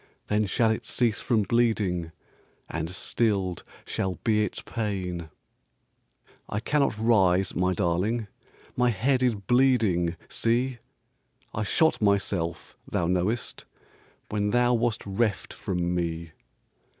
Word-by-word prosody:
Then 105 0 +2
shall 110 +4 +2
it 110 +2 -2
cease 115 0 0
from 115 -5 +2
bleeding. 100 -7 +1 0.6
And 80 0 -3
stilled 95 -1 0 0.2
shall 95 -1 -2
be 105 -1 +3
its 105 - -4
pain." 95 -7 -3 1.2
"I 105 - -1
cannot 140 -1 +1
rise, 95 -5 +3
my 90 0 +1
darling, 100 +5 0 0.5
My 125 0 +3
head 125 +4 +1
is 125 -3 +3
bleeding 105 -6 +2
see! 120 +2 0 0.7
I - - -2
shot 160 +8 +2
myself, 100 -5 0
thou 85 - 0
knowest, 90 +7 -1 0.6
When 105 -1 0
thou 120 +2 +3
wast 120 -1 0
reft 100 +1 -1
from 90 -1 -2
me." 85 -1 -2
105 Hz, 115 wpm, -27 LUFS, 90-120 Hz, 1.2 s, be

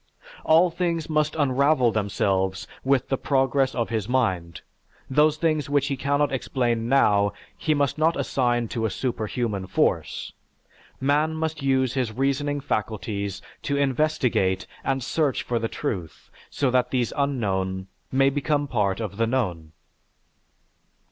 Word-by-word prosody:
All 165 +3 +5
things 165 -2 -2
must 155 0 +1
unravel 140 -3 +3
themselves 95 -3 0 0.2
with 135 -1 +1
the 135 - 0
progress 135 -1 +1
of 115 -2 -1
his 110 -1 -2
mind, 95 -10 0 0.5
those 150 +2 +4
things 155 -3 0
that 145 -1 +2
he 140 0 -1
cannot 140 +2 +1
explain 120 -3 -1
now, 100 -7 +4 0.2
he 155 -1 0
must 145 +1 0
not 160 +2 +2
assign 120 -3 +1
to 115 -2 -1
a - - -3
superhuman 110 -3 -2
force; - - 0 0.7
man 150 +4 +1
must 160 -1 -3
use 130 -2 +2
his 125 -4 -1
reasoning 140 +4 0
faculties 105 -5 -3 0.2
to 140 - -1
investigate 130 -10 +1 0.2
and 135 -1 -1
search 150 +1 0
for 120 -1 -1
the 115 - -1
truth 90 - -5 0.2
so 135 -3 0
that 125 -1 +2
these 125 -3 0
unknown 95 -9 -1 0.3
may 135 +1 +4
become 145 +1 0
part 105 -6 0
of 105 -3 -5
the 115 0 +2
known. 90 -11 -2
130 Hz, 140 wpm, -25 LUFS, 110-145 Hz, 0.7 s, All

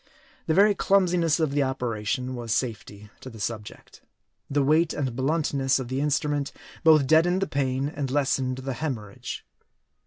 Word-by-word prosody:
The 160 - +2
very 205 +2 +6
clumsiness 180 -6 +2
of 155 -3 +1
the 145 +1 +1
operation 125 -1 -2
was 120 -4 -2
safety 105 -4 -4
to 130 - -9
the 115 -3 -12
subject. 105 0 -6 0.5
The 145 0 +1
weight 155 +4 +3
and 130 -5 -2
bluntness 135 -1 +1
of 130 -3 -5
the 130 +2 -1
instrument 145 -1 0 0.3
both 155 -3 +6
deadened 175 +6 +3
the - - -2
pain 135 -1 -1
and 145 -2 -4
lessened 135 -2 0
the 135 0 -4
hemorrhage. 115 -7 -5
135 Hz, 155 wpm, -26 LUFS, 125-155 Hz, 0.5 s, very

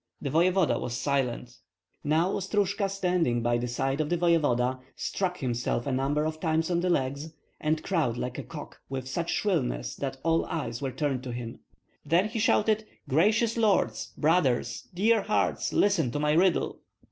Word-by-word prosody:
The 140 - -3
voevoda 180 +2 +3
was 120 0 -3
silent. 125 -3 -1 0.5
Now 160 +5 +2
Ostrojka, 200 0 0
standing 180 -11 0
by 120 0 +2
the 125 - -2
side 135 +4 -1
of 150 - -2
the 175 - +1
voevoda, 145 -7 +2 0.2
struck 180 -2 -2
himself 120 -2 -1
a 140 - -1
number 140 +4 0
of 155 0 -3
times 160 +1 0
on 170 - +2
the 180 +1 0
legs, 140 0 -1 0.3
and 155 +1 0
crowed 160 -11 0
like 125 +2 -4
a - - -4
cock 145 +4 -9
with 130 -1 -4
such 170 +6 -3
shrillness - - -1
that 135 -1 -4
all 165 0 +2
eyes 120 -6 -4
were 135 - -1
turned 140 -2 -1
to 125 - -4
him. 120 -1 -6 0.4
Then 170 +7 +2
he 225 +1 -3
shouted, 215 0 +2 0.2
"Gracious 215 - +2
lords! 220 -3 +1
brothers, 150 -6 +1
dear 215 +5 +3
hearts! 210 +2 0
listen 195 -10 +2
to 145 - -1
my 150 0 +2
riddle." 175 +3 +2
155 Hz, 170 wpm, -28 LUFS, 130-180 Hz, 0.5 s, voevoda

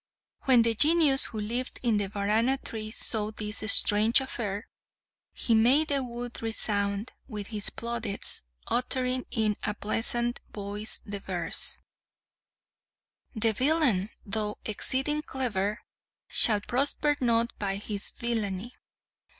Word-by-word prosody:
When 250 -3 +6
the 230 0 +2
Genius 295 +2 +7
who 220 - -2
lived 235 +5 -2
in 230 -4 +2
the 200 -2 -1
Varana 215 +6 +1
tree 220 -4 -6
saw 215 -1 +1
this 215 0 0
strange 215 +4 +5
affair, 220 -6 -4 0.6
he 235 - 0
made 255 +8 +5
the 280 -1 +1
wood 240 0 -7
resound 205 -1 -1 0.2
with 210 -5 -6
his 210 -1 +3
plaudits, 235 -3 -2 0.3
uttering 255 0 0
in 215 -2 0
a 210 - -2
pleasant 240 +3 0
voice 205 +1 -5
the 200 -1 -5
verse: 175 -4 -2 1.6
"The 220 0 +2
villain, 255 - +2 0.2
though 210 0 -2
exceeding 265 +7 -1
clever, 215 -8 -2 0.5
Shall 210 -3 +2
prosper 285 +5 +1
not 235 -1 +1
by 195 -2 -1
his 205 0 -5
villainy. 225 -2 -3
225 Hz, 120 wpm, -28 LUFS, 210-250 Hz, 1.6 s, Genius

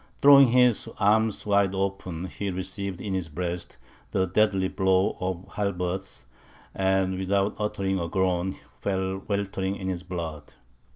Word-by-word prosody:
Throwing 140 -1 +8
his 125 -2 +3
arms 110 +1 +2
wide 100 -2 +2
open, 95 -3 -3
he 100 +2 -4
received 95 0 -4
in 100 -2 -3
his 95 -4 -2
breast, 85 +2 -4 0.3
the 95 - +1
deadly 95 0 +2
blow 95 0 +2
of 95 -1 -3
the - - -20
halberds, 95 -5 -3 0.5
and 95 -1 +1
without 100 +2 +1
uttering 95 -2 -1
a 85 - -2
groan, 95 0 0 0.2
fell 95 -1 -1
weltering 100 -1 -1
in 95 -1 -4
his 90 -2 -3
blood. 85 -5 -6
95 Hz, 140 wpm, -26 LUFS, 90-100 Hz, 0.5 s, Throwing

